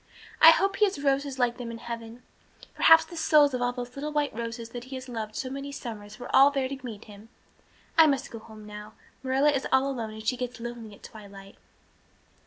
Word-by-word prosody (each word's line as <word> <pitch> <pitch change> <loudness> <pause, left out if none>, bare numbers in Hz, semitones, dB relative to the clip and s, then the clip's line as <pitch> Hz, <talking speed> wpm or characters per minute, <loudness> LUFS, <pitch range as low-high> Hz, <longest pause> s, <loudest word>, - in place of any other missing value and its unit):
I 320 - +11
hope 390 +4 +3
he 425 - +5
has 375 -8 -3
roses 275 -1 0
like 245 -1 +1
them 245 -2 -6
in 230 - -6
heaven. 235 +1 -8 0.5
Perhaps 325 0 +6
the 345 - -11
souls 300 -3 +4
of 250 - -2
all 245 0 +1
those 245 0 -7
little 295 +2 -4
white 295 -1 -1
roses 230 0 -6
that 240 +1 -8
he 265 +1 -8
has 260 0 -7
loved 220 -3 -6
so 265 - -3
many 275 +1 -6
summers 215 -6 -8
were 245 - -4
all 275 +1 +8
there 275 -2 -1
to 270 0 -6
meet 225 -4 -8
him. 210 +1 -14 0.7
I 320 - +9
must 275 -3 -1
go 230 - -7
home 215 -1 -13
now. 210 0 -10 0.3
Marilla 270 +3 +2
is 275 -2 -2
all 265 +1 +3
alone 230 -4 -4
and 220 0 -10
she 250 +3 0
gets 250 0 -5
lonely 230 -3 -8
at - - -23
twilight." 200 -2 -12
245 Hz, 220 wpm, -27 LUFS, 225-275 Hz, 0.7 s, I